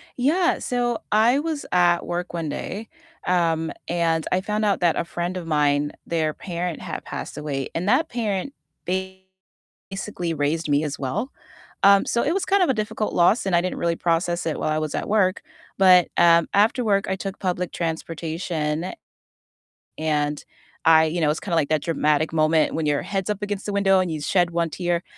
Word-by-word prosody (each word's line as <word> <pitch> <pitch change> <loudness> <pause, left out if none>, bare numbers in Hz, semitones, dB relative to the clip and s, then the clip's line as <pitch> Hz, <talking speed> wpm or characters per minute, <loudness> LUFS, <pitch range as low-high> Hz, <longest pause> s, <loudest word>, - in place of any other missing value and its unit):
Yeah, 330 +8 +2
so 240 -2 -1
I 230 +6 +4
was 315 -2 -3
at 175 -1 +3
work 175 0 -4
one 165 -3 -3
day, 215 +8 -5 0.4
um, 165 -3 +1 0.2
and 165 -2 0
I 185 - +2
found 210 +2 -2
out 200 -2 +1
that 175 -2 +2
a - - 0
friend 175 +2 -4
of 175 - -6
mine, 145 -1 +1
their 160 -2 0
parent 175 -1 -4
had - - -6
passed - - -7
away, 140 -3 -3
and 175 +4 -2
that 310 +7 +3
parent 225 +2 -2 1.4
basically 195 -3 -4
raised 155 +2 -1
me 145 +1 +2
as 150 -2 -3
well, 135 - -3 0.5
um, 200 0 +6
so 235 - +1
it 310 - +1
was 390 +1 -1
kind 395 -1 +3
of 350 - +1
a 265 - +4
difficult 215 -1 -2
loss, 180 +7 +3
and 190 -3 +1
I 170 - +4
didn't 185 - -3
really 170 0 0
process 170 +1 0
it 160 - -2
while - - -1
I 155 0 +1
was 155 -1 -3
at - - -3
work, 195 -3 +2 0.4
but, 185 -2 +6
um, 170 -1 +5
after 220 +5 +3
work, 200 -3 +1
I 190 - 0
took 195 0 -6
public 180 -2 -2
transportation 165 0 -3 1.0
and 150 -1 -1 0.4
I 160 0 +7
you 165 +3 -2
know, 155 - +3
it - - +3
was 150 - 0
kinda 175 -5 -3
like 150 -3 +1
that 155 -2 +1
dramatic 155 -1 +1
moment 155 0 +2
when 160 - -1
your 145 -1 +1
head's 195 0 -3
up 210 -1 -2
against 205 -1 -4
the 205 - -3
window 195 -1 +3
and 185 -2 0
you 155 -2 -4
shed 175 +3 +1
one 170 -1 0
tear, 175 +1 -1
175 Hz, 195 wpm, -23 LUFS, 160-200 Hz, 1.4 s, I